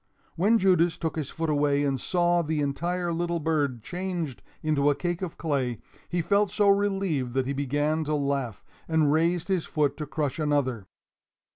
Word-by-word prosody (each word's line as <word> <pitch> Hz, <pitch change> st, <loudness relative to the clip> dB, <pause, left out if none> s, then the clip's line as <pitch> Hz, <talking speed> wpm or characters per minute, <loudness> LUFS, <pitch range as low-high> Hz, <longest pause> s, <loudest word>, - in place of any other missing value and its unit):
When 205 Hz, +7 st, +4 dB
Judas 180 Hz, -4 st, +3 dB
took 160 Hz, -, -3 dB
his 150 Hz, -4 st, -3 dB
foot 165 Hz, -1 st, -2 dB
away 145 Hz, -1 st, +2 dB
and 135 Hz, -3 st, 0 dB
saw 175 Hz, -1 st, +2 dB
the 155 Hz, -1 st, -1 dB
entire 170 Hz, +5 st, -1 dB
little 170 Hz, 0 st, -1 dB
bird 145 Hz, -7 st, 0 dB
changed 175 Hz, -6 st, -4 dB, 0.2 s
into 145 Hz, -2 st, +2 dB
a 145 Hz, -, +2 dB
cake 175 Hz, +2 st, -2 dB
of 185 Hz, -4 st, -5 dB
clay, 135 Hz, -7 st, -1 dB, 0.3 s
he 175 Hz, -1 st, 0 dB
felt 200 Hz, +3 st, +2 dB
so 205 Hz, -1 st, +3 dB
relieved 195 Hz, -11 st, +1 dB
that 130 Hz, -1 st, +1 dB
he 140 Hz, -, -1 dB
began 145 Hz, +3 st, 0 dB
to 150 Hz, +1 st, 0 dB
laugh, 140 Hz, -6 st, -2 dB, 0.2 s
and 160 Hz, -3 st, +3 dB
raised 165 Hz, +2 st, +1 dB
his 190 Hz, -4 st, 0 dB
foot 145 Hz, -2 st, 0 dB
to 150 Hz, -1 st, -5 dB
crush 145 Hz, -1 st, -2 dB
another. 135 Hz, -9 st, 0 dB
155 Hz, 175 wpm, -27 LUFS, 140-175 Hz, 0.3 s, When